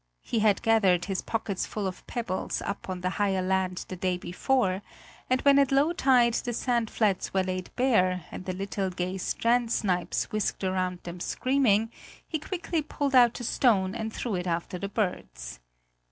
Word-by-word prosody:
He 230 - -1
had 210 -1 +3
gathered 195 -6 +3
his 195 -2 -2
pockets 210 -4 -2
full 210 -2 -4
of 185 -1 -5
pebbles 230 -6 -3
up 200 - -5
on 185 -1 -4
the 185 0 -1
higher 190 -2 +1
land 185 -1 -1
the 185 - -6
day 180 0 -1
before, 185 +2 0 0.5
and 255 0 +2
when 280 0 +6
at 275 -2 +3
low 285 +5 +3
tide 250 -6 +4
the 240 +1 -2
sand 235 -1 0
flats 200 -4 0
were 190 - +3
laid 185 0 -4
bare 185 -9 +2
and 185 - -7
the 185 - -2
little 195 +1 -2
gay 185 +1 -3
strand 235 +4 +1
snipes 180 -6 0
whisked 215 -1 -1
across 185 -1 0
them 175 +1 -7
screaming, 225 -1 +1 0.4
he 315 - -2
quickly 330 0 -2
pulled 285 -2 -2
out 240 -2 +5
a - - -5
stone 200 -6 +2
and 220 0 -4
threw 230 0 -3
it 180 -1 -2
after 175 +1 -2
the 200 - -4
birds. - - -3
200 Hz, 180 wpm, -28 LUFS, 185-240 Hz, 0.5 s, when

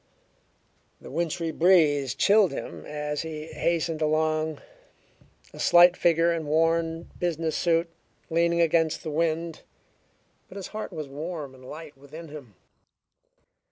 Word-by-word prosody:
The - - -11
wintry 165 -1 -2
breeze 150 -7 +3
chilled 200 +6 +4
him - - -7
as 150 0 -3
he 155 -1 -6
hastened 165 -1 -1
along, 155 0 0 0.9
a - - -11
slight 175 +1 +6
figure 170 0 +3
in 160 -2 -4
worn 165 +1 0
business 165 -2 -1
suit, 165 0 +1 0.4
leaning 170 +1 +2
against 165 -1 +2
the 155 - -4
wind, 165 +1 -1 0.9
but - - -14
his 195 -2 -6
heart 215 0 -6
was 155 -2 -6
warm 150 0 -6
and 130 0 -16
light 150 +3 -10
within 150 +4 -11
him. 140 -9 -11
160 Hz, 125 wpm, -26 LUFS, 150-170 Hz, 0.9 s, slight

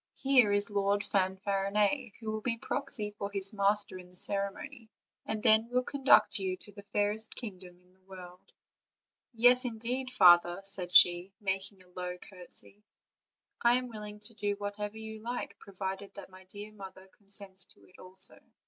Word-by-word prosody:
here 260 -6 +4
is 205 +1 0
Lord 200 0 +1
Fanfarinet, 200 +5 0
who 220 -1 -4
will 215 0 -3
be 230 0 -1
proxy 235 -4 -3
for 200 - -3
his 195 0 0
mas 205 0 +3
ter 185 - -10
in 180 - -12
the 180 - -12
ceremony, 200 +4 -3 0.4
and 215 -1 -3
then 220 +2 +4
will 250 +1 +1
conduct 270 -5 +4
you 185 -1 -2
to 205 - -14
the 200 0 -11
fairest 205 +2 -2
kingdom 185 -6 -9
in 180 0 -28
the 190 - -31
world?" 180 -1 -12 0.8
"Yes, 245 +2 +6
indeed, 245 +2 -2
father," 175 -7 +6
said 190 -2 0
she, 175 +1 +6
making 195 -1 -3
a 180 - -24
low 180 0 -5
cour 180 -1 -11
tesy; 205 - -5 0.8
"I 240 +1 +5
am 250 0 -1
willing 210 -2 -8
to 220 +2 -3
do 205 -2 -2
whatever 205 +1 -5
you 220 0 -8
like, 230 -3 -5
provided 195 0 -6
that 200 -2 -10
my 185 0 -15
dear 205 +3 -9
mother 190 -2 -11
consents 195 -2 -1
to - - -19
it 185 - -21
also." 185 +1 -2
205 Hz, 175 wpm, -31 LUFS, 190-220 Hz, 0.8 s, Yes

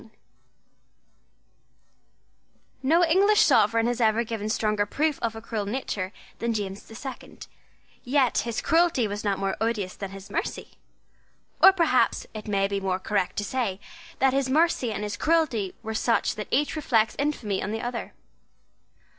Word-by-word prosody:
No 330 +6 +4
English 395 +6 +4
sovereign 225 +2 +4
has 240 0 -1
ever 220 +1 +3
given 220 -2 -4
stronger 210 -1 0
proof 300 +6 0
of 225 -1 -2
a 225 - -7
cruel 220 -3 -4
nature 200 -5 -3 0.3
than 230 -1 -1
James 200 -1 -4
the 225 - -14
Second. 265 +3 -9 0.6
Yet 260 -1 +2
his 235 -1 -2
cruelty 325 -8 +3
was 205 +1 -5
not 200 -2 0
more 195 0 -1
odious 215 -5 -1
than 195 - -6
his 195 0 -11
mercy. - - -3 0.9
Or 385 - +10
perhaps 340 -4 +2
it 215 -1 -8
may 195 -1 +1
be 200 0 -2
more 190 -1 0
correct 195 -1 -1
to 205 - -2
say 205 -4 -2 0.4
that 265 -1 +3
his 270 -1 0
mercy 300 -4 +2
and 210 0 -4
his 205 0 -4
cruelty 300 - +1
were 220 0 -4
such 230 +1 +1
that 210 - -6
each 290 +4 +1
reflects 225 -8 +1
infamy 240 -9 -1
on - - -3
the 225 +1 -3
other. 240 -1 -5
225 Hz, 155 wpm, -26 LUFS, 205-270 Hz, 0.9 s, Or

